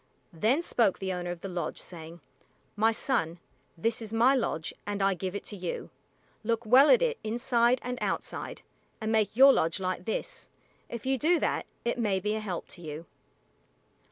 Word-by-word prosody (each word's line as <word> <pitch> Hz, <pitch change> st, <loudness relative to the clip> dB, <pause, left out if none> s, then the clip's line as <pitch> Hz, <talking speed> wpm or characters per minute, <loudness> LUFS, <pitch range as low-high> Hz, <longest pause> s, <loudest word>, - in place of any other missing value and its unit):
Then 230 Hz, -, +2 dB
spoke 230 Hz, -, +2 dB
the 190 Hz, -1 st, -3 dB
owner 175 Hz, -1 st, -4 dB
of 175 Hz, -1 st, -5 dB
the 195 Hz, -, -5 dB
lodge 180 Hz, -2 st, -3 dB
saying, 165 Hz, -1 st, -10 dB, 0.5 s
"My 220 Hz, +2 st, +4 dB
son, 180 Hz, -, -1 dB, 0.4 s
this 225 Hz, +7 st, 0 dB
is 220 Hz, -2 st, -6 dB
my 235 Hz, +4 st, +5 dB
lodge, 195 Hz, -11 st, -1 dB
and 205 Hz, 0 st, -3 dB
I 195 Hz, 0 st, +3 dB
give 185 Hz, +1 st, -4 dB
it 200 Hz, -, -4 dB
to 210 Hz, -, -8 dB
you. 180 Hz, -3 st, -5 dB, 0.5 s
Look 230 Hz, +1 st, -1 dB
well 260 Hz, +6 st, +7 dB
at -, -, +6 dB
it 475 Hz, -1 st, 0 dB
inside 235 Hz, +2 st, +2 dB
and 250 Hz, 0 st, -4 dB
outside; -, -, -3 dB, 0.4 s
and 220 Hz, 0 st, -2 dB
make 215 Hz, -2 st, +2 dB
your 270 Hz, +1 st, +9 dB
lodge 165 Hz, +4 st, +1 dB
like 185 Hz, -1 st, -3 dB
this. -, -, -4 dB, 0.4 s
If 235 Hz, 0 st, -6 dB
you 265 Hz, 0 st, +1 dB
do 335 Hz, +4 st, +3 dB
that, -, -, 0 dB, 0.2 s
it 235 Hz, +1 st, 0 dB
may 205 Hz, -4 st, +1 dB
be 210 Hz, +3 st, -1 dB
a 220 Hz, -, -1 dB
help 190 Hz, -5 st, -4 dB
to 175 Hz, -, -9 dB
you." 155 Hz, 0 st, -7 dB
215 Hz, 185 wpm, -29 LUFS, 185-240 Hz, 0.5 s, your